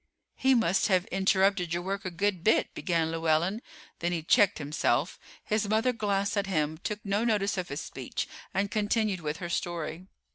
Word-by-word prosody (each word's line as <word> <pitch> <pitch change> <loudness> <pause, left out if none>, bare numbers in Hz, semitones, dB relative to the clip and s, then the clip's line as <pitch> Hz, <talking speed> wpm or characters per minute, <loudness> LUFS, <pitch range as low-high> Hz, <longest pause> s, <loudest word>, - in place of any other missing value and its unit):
"He 265 0 +3
must 210 -6 +2
have 185 -2 +2
interrupted 190 -2 +2
your 175 - -2
work 195 +2 -3
a - - -1
good 185 0 -1
bit," 220 - +3
began 165 -3 0
Llewellyn, 165 +6 +1 0.4
then 175 +1 -1
he 165 -2 -2
checked 200 +4 +4
himself. 150 +1 0 0.2
His 210 -1 0
mother 225 +4 +2
glanced 200 -3 0
at 200 -1 0
him, 155 -4 -1
took 210 +3 -5
no 200 +2 +1
notice 210 -3 +1
of 185 -2 -3
his 140 +3 -4
speech, - - -5 0.2
and 200 +1 -1
continued 210 -3 0
with 150 -1 -3
her 175 - -5
story. 170 0 -3
190 Hz, 180 wpm, -29 LUFS, 170-205 Hz, 0.4 s, checked